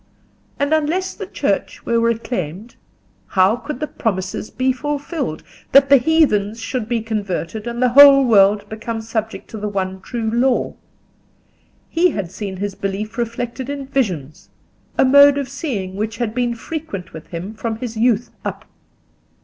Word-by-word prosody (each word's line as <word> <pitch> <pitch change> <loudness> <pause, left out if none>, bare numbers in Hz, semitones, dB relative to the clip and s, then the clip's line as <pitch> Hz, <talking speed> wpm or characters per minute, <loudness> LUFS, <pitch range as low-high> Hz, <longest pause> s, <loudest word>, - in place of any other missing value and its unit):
And 285 +2 +1
unless 325 +5 0
the - - -7
Church - - -2
were 235 0 +2
reclaimed, 225 -3 -2 0.5
how 190 - +3
could 255 +2 -6
the 305 - -1
promises 190 -7 -3
be 260 0 0
fulfilled, 290 - -3 0.3
that 275 +1 +7
the 280 - +8
heathens 240 -7 +2
should 225 0 -4
be 235 -2 0
converted 210 -1 -3
and 235 0 -4
the 250 - +4
whole 275 +1 +8
world 205 -2 +4
become 225 +1 -5
subject 220 0 -4
to 220 - -6
the 210 0 -3
one 190 -1 -3
true 225 +1 -3
law? 245 +2 +1 1.1
He 350 +2 +3
had 195 - -4
seen 195 -1 -5
his 200 +1 -3
belief 200 +3 -4
reflected 240 +2 -4
in 285 -1 -4
visions—a 185 - -3
mode 285 +1 +7
of 280 -2 -2
seeing 240 - -4
which 215 +2 -3
had 230 -3 -2
been 240 -1 0
frequent 230 - -6
with 160 -1 -10
him 180 +5 -6
from 225 0 -3
his 230 0 -6
youth 230 0 +1
up. - - -5
230 Hz, 155 wpm, -19 LUFS, 205-270 Hz, 1.1 s, the